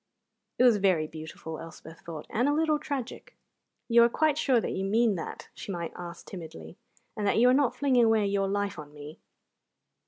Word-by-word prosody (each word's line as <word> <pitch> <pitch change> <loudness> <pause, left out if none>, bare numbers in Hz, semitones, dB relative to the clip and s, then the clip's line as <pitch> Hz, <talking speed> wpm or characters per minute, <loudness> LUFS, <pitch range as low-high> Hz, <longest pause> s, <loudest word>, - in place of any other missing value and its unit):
It - - +3
was 240 -4 +6
very 185 -6 +2
beautiful, 160 0 -8
Elspeth 165 0 -11
thought, 160 -3 -8
and 245 +6 +1
a - - +2
little 310 0 +1
tragic. 280 - -6 0.5
"You 235 -1 +6
are 235 - +6
quite 310 +4 +2
sure 265 -5 +2
that - - -3
you 190 - -3
mean 220 +3 +2
that," 170 - -7
she - - -7
might 170 -3 -4
ask 170 -1 -9
timidly, 120 - -9 0.4
"and 210 -1 -2
that - - +2
you 240 +2 +5
are - - +5
not 275 -2 +2
flinging 255 -4 +3
away 220 -2 +3
your 200 0 0
life 200 -2 -2
on 150 0 -11
me?" 150 +1 -10
205 Hz, 195 wpm, -28 LUFS, 165-245 Hz, 0.5 s, was